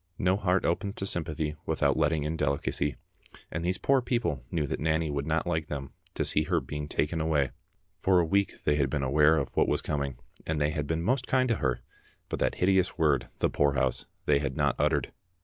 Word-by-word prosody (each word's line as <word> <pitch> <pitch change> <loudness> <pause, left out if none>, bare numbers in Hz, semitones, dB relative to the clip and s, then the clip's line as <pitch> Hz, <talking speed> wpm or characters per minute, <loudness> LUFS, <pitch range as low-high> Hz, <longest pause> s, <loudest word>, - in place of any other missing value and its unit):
No 95 +1 +2
heart 95 -2 +1
opens 100 +4 -1
to 95 - -3
sympathy 80 -4 -2
without - - +2
letting 80 -3 +1
in 75 +2 -2
delicacy, 70 -1 -1 0.6
and 80 - -3
these 90 +1 0
poor 135 -1 +3
people 120 - -1
knew 80 -3 0
that - - -3
Nanny 80 0 +1
would 70 0 -2
not 80 0 +1
like 80 -3 -1
them 70 -2 -5 0.2
to - - 0
see 75 - +3
her - - +2
being 75 -1 -5
taken 80 +2 -1
away. 75 -4 +1 0.5
For 95 -1 +4
a 85 - +3
week 100 +4 0
they 75 0 +2
had 70 -2 +1
been 70 -1 -1
aware 75 +4 +4
of 70 - -3
what - - +3
was - - +2
coming, 70 -4 -2 0.3
and 80 -1 -2
they 75 0 +2
had 75 -1 -3
been 80 +1 -1
most 125 +5 +1
kind 130 -1 +2
to 115 - +2
her, 65 -4 -1 0.5
but - - -3
that - - +1
hideous 95 0 +2
word, 80 -3 +2
the - - +1
poorhouse, 65 -3 +1 0.2
they 70 -1 +4
had 70 -2 -3
not - - +2
uttered. 75 -2 +1
80 Hz, 215 wpm, -28 LUFS, 70-90 Hz, 0.6 s, For